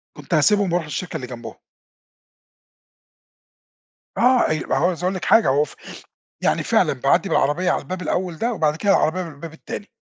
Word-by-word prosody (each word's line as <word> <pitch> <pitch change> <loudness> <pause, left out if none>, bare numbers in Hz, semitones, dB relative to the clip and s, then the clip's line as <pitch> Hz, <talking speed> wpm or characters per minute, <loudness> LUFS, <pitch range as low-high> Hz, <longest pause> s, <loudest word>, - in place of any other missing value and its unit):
كنت - - -8
هاسيبهم 200 -4 +3
وارُوح 175 -3 0
الشركة 160 +3 -5
اللي 130 -5 -4
جنبهم. 120 -1 -9 2.6
آه 250 -5 +3
ي 155 - -1
وعاوز 175 0 0
أقول 185 +1 0
لِك 185 - -5
حاجة 225 - +5
هو 145 +3 +3
ف - - -15 0.7
يعني - - +1
فعلًا - - +2
باعدِّي - - +1
بالعربية 175 +5 +1
على - - -1
الباب 185 0 -6
الأول 180 0 -2
ده 235 +1 -1
وبعد 155 -5 0
كده 200 +5 -2
العربية 185 0 +2
من 165 - -8
الباب 160 +3 -10
التاني. 205 +5 -8
175 Hz, 170 wpm, -21 LUFS, 155-190 Hz, 2.6 s, حاجة